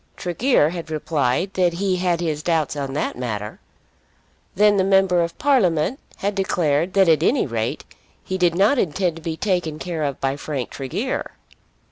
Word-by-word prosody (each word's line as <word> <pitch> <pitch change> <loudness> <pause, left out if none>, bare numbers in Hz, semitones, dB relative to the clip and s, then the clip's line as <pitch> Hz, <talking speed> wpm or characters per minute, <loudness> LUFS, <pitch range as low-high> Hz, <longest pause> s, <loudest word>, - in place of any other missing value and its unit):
Tregear 180 - +2
had 170 -2 -6
replied 155 +2 -1
that 180 -2 +2
he 185 +1 0
had 175 -2 0
his 155 -3 -2
doubts 160 -4 0
on 140 -2 -4
that 145 - -2
matter. 105 -4 -5 1.0
Then 210 +1 +4
the 190 - +3
Member 190 -2 +3
of 170 0 -3
Parliament 235 - +2 0.2
had 200 +1 -2
declared 175 -4 0
that 195 -2 +4
at 160 -2 +4
any 255 - +2
rate 115 -3 -3 0.4
he 190 0 -4
did 175 -2 +3
not 205 +9 +3
intend 175 -1 0
to - - -10
be 160 0 -4
taken 175 -6 -1
care 165 -1 -4
of 140 -2 -2
by 135 +1 -1
Frank 140 -4 -4
Tregear! 175 - -3
170 Hz, 170 wpm, -22 LUFS, 150-190 Hz, 1.0 s, Then